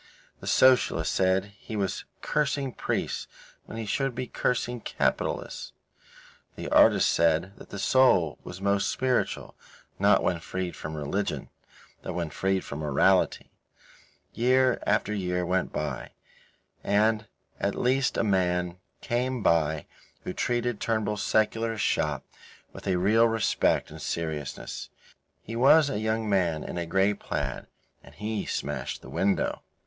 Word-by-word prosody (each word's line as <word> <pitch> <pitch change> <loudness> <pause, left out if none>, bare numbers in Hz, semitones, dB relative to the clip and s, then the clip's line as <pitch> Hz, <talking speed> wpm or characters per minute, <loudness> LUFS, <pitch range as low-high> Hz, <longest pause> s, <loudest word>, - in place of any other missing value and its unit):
The - - -9
socialists 125 -11 +4
said 95 +2 +1
he 110 - -7
was 100 -3 -2 0.2
cursing 140 -3 0
priests - - -2 0.4
when 115 - -8
he 115 - -3
should 135 +4 -1
be 130 +1 -3
cursing 120 0 -1
capitalists. - - -2 0.8
The - - -5
artists - - +6
said 85 +4 +2
that - - -13
the 100 - -7
soul 95 - +3
was 90 - -8
most 100 0 +1
spiritual, 130 -1 -1 0.4
not - - +4
when 85 - +1
freed 90 +2 -4
from 80 0 -6
religion, 95 +8 -2 0.5
but 90 - -5
when 85 -3 -3
freed 95 +2 0
from 70 - -6
morality. 75 -3 +2 0.8
Year 130 +1 +3
after 105 0 +1
year 90 -3 -1
went 95 +2 0
by, 75 -4 -4 0.7
and 110 +1 +2 0.3
at 100 - 0
least 130 +1 +1
a - - +2
man 90 -3 +1 0.2
came 125 0 -1
by 80 -2 +2 0.4
who - - -4
treated 120 -1 -1
Mr. - - -28
Turnbull's 105 -2 -1
secularist 110 +1 +1
shop - - 0 0.5
with - - -9
a 95 - +2
real 110 +6 +4
respect 115 -1 +1
and - - -9
seriousness. 80 -4 -4 0.5
He 115 - -6
was 140 +4 +5
a 105 - -1
young 110 0 -1
man 90 -6 +1
in 90 - -5
a 85 - -3
grey 95 +4 +3
plaid, - - -4 0.3
and - - -16
he 105 0 -3
smashed 75 +1 -3
the - - -10
window. 100 0 0
100 Hz, 140 wpm, -27 LUFS, 90-115 Hz, 0.8 s, artists